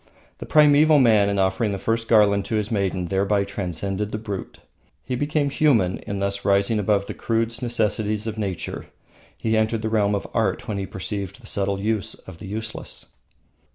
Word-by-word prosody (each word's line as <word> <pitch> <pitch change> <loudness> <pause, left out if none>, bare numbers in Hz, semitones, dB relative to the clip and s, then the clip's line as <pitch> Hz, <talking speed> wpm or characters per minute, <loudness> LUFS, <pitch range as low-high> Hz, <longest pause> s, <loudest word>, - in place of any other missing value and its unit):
The - - -7
primeval 150 0 +6
man 110 -6 +5
in 100 - -1
offering 95 +2 +1
the - - -2
first 115 +3 -1
garland 105 -3 +4
to 110 - -2
his 105 0 -1
maiden 95 -4 0
thereby 100 +1 +1
transcended 100 +1 -3
the - - -2
brute. 105 -3 -6 0.5
He - - -4
became 145 +1 0
human 120 -12 +2
in 100 - -5
thus 100 0 -2
rising 100 +2 +2
above 100 -1 +1
the - - -6
crude 115 0 0
necessities 110 -3 0
of 110 -1 -3
nature. 100 -5 -4 0.5
He 110 0 0
entered 110 0 +1
the 110 - 0
realm 105 -2 +2
of 100 - -3
art 110 -5 0
when 105 -2 -2
he 95 - -4
perceived 100 +1 -5
the - - -16
subtle 100 0 -1
use 105 0 -1
of 90 -3 -13
the 100 - -8
useless. 110 +2 -6
105 Hz, 185 wpm, -23 LUFS, 100-110 Hz, 0.5 s, primeval